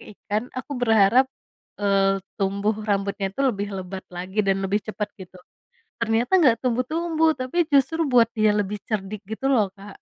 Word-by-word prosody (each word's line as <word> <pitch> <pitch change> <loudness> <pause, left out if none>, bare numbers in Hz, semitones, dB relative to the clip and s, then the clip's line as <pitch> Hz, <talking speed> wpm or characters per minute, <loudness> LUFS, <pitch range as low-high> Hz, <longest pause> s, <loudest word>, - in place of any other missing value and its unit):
ikan, 215 +3 -5
aku 260 - -5
berharap, 225 +3 +4 0.5
eee, 195 -1 +3 0.2
tumbuh 200 +2 +1 0.2
rambutnya 200 0 0
itu 195 - -7
lebih 205 -6 0
lebat 190 0 -6
lagi 185 +4 -6
dan 195 0 +3
lebih 205 +2 0
cepet 210 -1 -3
gitu. 185 0 -11 0.6
Ternyata 230 +3 0
nggak 255 -8 +5
tumbuh-tumbuh, 315 +7 +1
tapi 255 +6 -5 0.2
justru 280 +4 +3
buat 245 -3 +6
dia 215 -2 +3
lebih 205 0 -1
cerdik 210 -1 -3
gitu 220 +5 -3
loh, 215 -6 +3
Kak. 200 0 -11
215 Hz, 155 wpm, -24 LUFS, 195-250 Hz, 0.6 s, buat